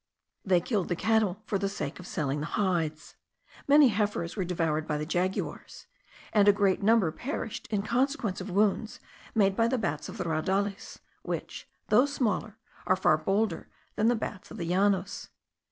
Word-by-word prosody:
They 185 -3 +3
killed 195 +1 -1
the 175 - -1
cattle 215 0 +1
for 200 -4 -1
the 200 0 -1
sake 200 - -5
of 180 - -10
selling 150 -3 -2
the 150 - -3
hides. 165 -6 -1 0.5
Many 285 -1 +7
heifers 205 -5 -1
were 195 - -1
devoured 165 -3 -1
by 150 - -1
the 150 - -3
jaguars, 180 +4 -3 0.5
and 205 -1 +5
a - - +10
great 200 -1 +1
number 210 -5 +4
perished 240 - -5
in 205 -2 0
consequence 240 -4 0
of 190 - -6
wounds 210 +3 +1 0.4
made 195 -3 +3
by 230 +2 +3
the 255 +2 0
bats 150 -10 -3
of - - -8
the - - -2
raudales, 190 +5 -2 0.2
which, - - -5 0.2
though 245 +6 +5
smaller, 220 -6 -1 0.3
are 185 - +4
far 185 -4 +3
bolder 195 +3 -1 0.3
than 215 - +2
the 240 - +4
bats 210 -3 -6
of - - -9
the 170 - -3
Llanos. 190 +3 0
195 Hz, 175 wpm, -28 LUFS, 175-220 Hz, 0.5 s, a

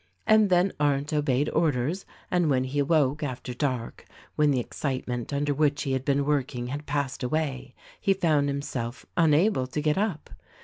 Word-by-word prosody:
And 215 -1 +5
then 180 +1 +3
Arndt 145 0 +1
obeyed 145 -1 +1
orders; 155 +4 0 0.2
and 175 -3 +2
when 130 -2 +2
he 130 +3 -2
awoke 145 -1 +2
after 130 -3 -4
dark, 125 -3 -3 0.3
when 150 -1 +3
the 135 -3 +2
excitement 125 -1 -3
under 145 +1 0
which 145 0 +1
he 140 - -2
had 130 -1 -1
been 140 0 +1
work 145 -3 0
ing 120 0 -4
had 145 +3 -5
passed 140 -3 -2
away, 135 -1 -2 0.2
he 195 -2 +2
found 155 -6 +2
himself 135 -3 -4
unable 160 -2 +3
to 130 - -3
get 150 +4 +1
up. 200 -7 -2
145 Hz, 175 wpm, -27 LUFS, 130-155 Hz, 0.3 s, And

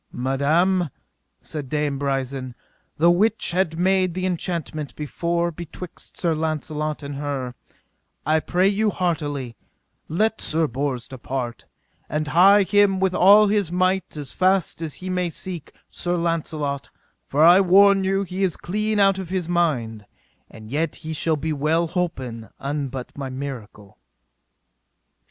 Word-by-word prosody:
Madam, 155 +8 +1 0.5
said 145 -4 -5
Dame 150 -2 -1
Brisen, 135 -2 -2 0.4
the 170 +3 +5
which 210 +5 +2
had 170 -2 0
made 185 -1 +2
the 185 0 -2
enchantment 170 -4 -3
before 170 +3 -1
betwixt 170 +2 -10
Sir 170 -2 +1
Launcelot 155 -1 -2
and 140 0 -5
her, 140 -4 -3 0.7
I 155 +1 +3
pray 180 +4 +1
you 210 +2 +2
heartily, 145 - -2 0.5
let 215 +7 0
Sir 160 +1 +2
Bors 135 -2 -2
depart, 130 -2 -5 0.4
and 150 0 -2
hie 195 +6 +6
him 200 0 +3
with 190 -1 +1
all 200 +4 +7
his 205 -4 +1
might 185 -1 0
as 145 -2 -7
fast 185 -3 +1
as 160 -3 -4
he 185 - -7
may 180 -1 0
to 160 - -10
seek 175 -5 -6 0.2
Sir 175 0 -2
Launcelot, 155 -4 -2 0.4
for 145 +3 +2
I 175 +4 +8
warn 195 +1 +6
you 195 +1 +1
he 185 +1 -5
is 180 -4 0
clean 210 +3 -1
out 195 -1 +4
of 185 -3 -6
his 185 -3 -2
mind; 125 -12 0 0.4
and 110 0 -12
yet 160 +4 -1
he 160 -1 -6
shall 160 0 0
be 155 +2 -2
well 155 +4 +1
holpen 130 - -3
an 140 0 -2
but 130 -1 -7
by 135 -2 -5
miracle. 125 - -8
160 Hz, 145 wpm, -23 LUFS, 140-185 Hz, 0.7 s, I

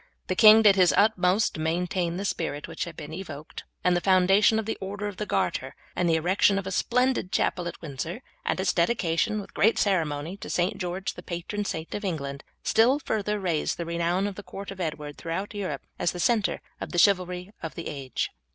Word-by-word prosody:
The 185 - +1
king 215 +3 +8
did 200 -2 +6
his 180 -2 +5
utmost 200 -1 +3
to - - -7
maintain 170 +2 -1
the 200 - -3
spirit 160 -6 -2
which 165 -1 -4
had 170 -2 -9
been 150 - -7
evoked, 155 -4 -8 0.2
and 180 0 +3
the 175 - +1
foundation 195 +4 +4
of 220 - -1
the 220 - -2
order 200 +2 -4
of 205 -2 -6
the 210 - -3
Garter, - - -1 0.2
and 175 -1 +1
the 165 - +4
erection 185 +4 +3
of 195 - -2
a 190 - -4
splendid 250 -1 +1
chapel 175 -2 0
at 170 - -6
Windsor, 165 - -5 0.2
and - - -1
its 190 0 +1
dedication, 175 +1 +1
with 200 - -9
great 220 +3 +3
ceremony, 165 -3 0
to - - -8
St. 180 +1 0
George, 180 +2 -3
the - - -10
patron 185 +4 -4
saint 160 -4 -4
of 205 - -4
England, 140 -7 -3 0.2
still 240 +5 +4
further 210 -6 -2
raised 175 -5 -1
the 170 - -3
renown 170 +3 0
of 205 - -2
the 205 - -8
court 200 0 -8
of 190 -1 -7
Edward 150 -3 -4
throughout 180 +6 -4
Europe 185 -9 -4
as - - +1
the 180 - -6
centre 215 +3 +1 0.2
of - - -5
the - - -2
chivalry 180 0 +2
of 160 - -6
the 170 - -5
age. 135 -3 -3
185 Hz, 215 wpm, -27 LUFS, 170-205 Hz, 0.2 s, king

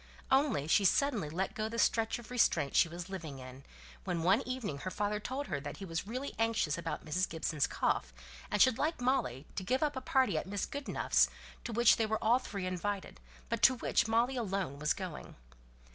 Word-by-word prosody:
Only 265 - +3
she 200 - +4
suddenly 215 - +2
let 185 +5 -2
go 215 0 -2
the 230 - -5
stretch 225 -1 +2
of 240 0 -12
restraint 225 - +2
she 170 - +5
was 175 +2 -7
living 165 -8 -6
in, 130 +1 -10 0.4
when 165 -1 -2
one 190 +5 +4
evening 245 - -3
her 185 - -4
father 210 +2 -1
told 260 +6 -4
her 145 - -3
that 145 0 -7
he 195 - -7
was 165 +2 -4
really 255 +5 -4
anxious 225 -10 +1
about 165 -1 -5
Mrs. 180 +4 0
Gibson's 155 -3 -1
cough, 60 - 0 0.4
and - - 0
should 255 +2 +5
like 315 0 0
Molly 155 - 0
to - - -2
give 255 +9 +1
up 295 -1 0
a 260 - -3
party 265 -8 +2
at - - -7
Mrs. 200 -1 -3
Goodenough's, 285 0 +2 0.4
to 240 - -3
which 235 +1 +5
they 225 - +1
were 220 0 0
all 235 +3 +3
three 200 -7 -5
invited, 185 - -3 0.3
but - - -2
to 260 - +7
which 235 - +1
Molly 235 +4 +2
alone 195 - -2
was 150 +1 +2
going. 185 -5 -7
205 Hz, 205 wpm, -33 LUFS, 165-245 Hz, 0.4 s, to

